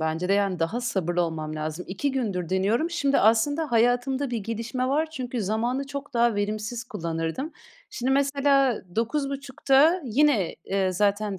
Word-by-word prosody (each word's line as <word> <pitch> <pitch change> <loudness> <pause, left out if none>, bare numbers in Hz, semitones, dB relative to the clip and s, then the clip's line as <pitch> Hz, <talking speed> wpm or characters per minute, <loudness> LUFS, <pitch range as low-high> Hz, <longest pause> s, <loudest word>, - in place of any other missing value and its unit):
bence 160 +3 -1
de. - - +3
Yani, 200 -2 +1
daha 165 +9 -1
sabırlı 185 -7 0
olmam 155 -2 -3
lazım. 155 +3 -4
2 200 +10 -1
gündür 200 -10 -2
deniyorum. 205 - +1
Şimdi 280 -5 +1
aslında 285 +9 +2
hayatımda 245 +4 +2
bir 240 - -1
gelişme 230 +4 -3
var. 310 +4 +1
Çünkü 255 -5 -4
zamanı 235 +7 -1
çok 280 0 -7
daha 235 -1 +3
verimsiz 215 +3 -3
kullanırdım. 170 - -4 0.4
Şimdi 255 +2 -1
mesela 275 -2 +2
21.30'da 275 +5 +2
yine, 245 - +2
eee, 190 -1 0
zaten 205 +1 0
235 Hz, 150 wpm, -25 LUFS, 195-275 Hz, 0.4 s, de